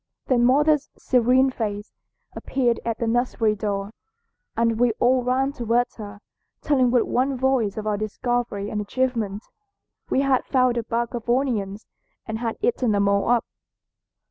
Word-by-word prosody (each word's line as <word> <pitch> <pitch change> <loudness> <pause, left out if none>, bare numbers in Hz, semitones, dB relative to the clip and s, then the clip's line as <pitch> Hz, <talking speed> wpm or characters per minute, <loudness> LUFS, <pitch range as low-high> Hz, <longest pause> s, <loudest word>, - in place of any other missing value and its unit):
Then 240 -2 +2
mother's 295 +3 +3
serene 255 +1 +3
face 210 -3 -4 0.4
appeared 245 -3 0
at 230 -1 -2
the 235 - -2
nursery 230 -2 +1
door 200 -1 -3 0.7
and 230 -1 +1
we 245 -2 +3
all 250 +3 +2
ran 260 +2 0
towards 240 -1 0
her, 205 -1 -9 0.4
telling 260 -4 +2
with 240 -1 +3
one 265 +1 0
voice 250 -6 +1
of 215 - -4
our 210 -1 0
discovery 215 -1 -2
and 210 - -2
achievement. 220 -2 -2 0.7
We 265 - +2
had 270 -2 +2
found 255 -2 +2
a 235 - -1
bag 235 +1 -2
of 240 -1 -6
onions 225 -6 -1 0.4
and 220 0 -4
had 230 -1 -3
eaten 340 - +1
them 200 0 +2
all 200 +2 +1
up. 240 -1 +2
240 Hz, 155 wpm, -23 LUFS, 215-255 Hz, 0.7 s, mother's